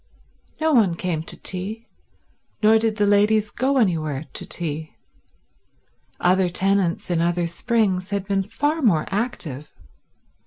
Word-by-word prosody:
No 315 0 +2
one 205 -9 +4
came 170 -3 -2
to 160 - -5
tea, 205 +5 -3 0.8
nor 220 +1 +6
did 220 -1 0
the 210 -1 +2
ladies 205 +1 +3
go 270 +2 0
anywhere 160 - 0
to - - -5
tea. 155 -2 -4 1.2
Other 185 0 +3
tenants 190 -1 0
in 170 -1 +1
other 175 0 +1
springs 190 0 0
had 200 -1 -2
been 195 0 0
far 290 - -1
more 185 - +3
active. 190 - -3
195 Hz, 130 wpm, -22 LUFS, 170-220 Hz, 1.2 s, nor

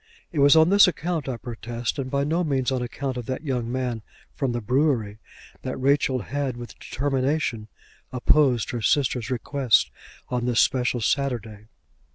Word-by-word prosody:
It 160 - -3
was 140 +2 +7
on 160 +1 +6
this 200 -1 +7
account, 165 -3 -2
I 125 - -3
protest, 120 +2 -5
and 130 -1 -3
by 140 +1 0
no 165 +5 0
means 135 -5 0
on 130 -1 -1
account 130 +2 -4
of 120 - -6
that 130 +3 -4
young 125 -5 -2
man 125 -3 -2 0.3
from 135 -4 -1
the 120 - -2
brewery, 120 -3 0 0.4
that 130 - -4
Rachel 135 -1 +2
had 135 -1 -3
with 120 0 -8
determination 135 -4 -1 0.4
opposed 130 -2 +2
her 120 - -3
sister's 125 -1 +1
request 125 -2 +1 0.4
on 125 -1 -2
this 120 -2 +2
special 125 -2 +2
Saturday. 115 -5 -2
130 Hz, 165 wpm, -24 LUFS, 120-140 Hz, 0.4 s, was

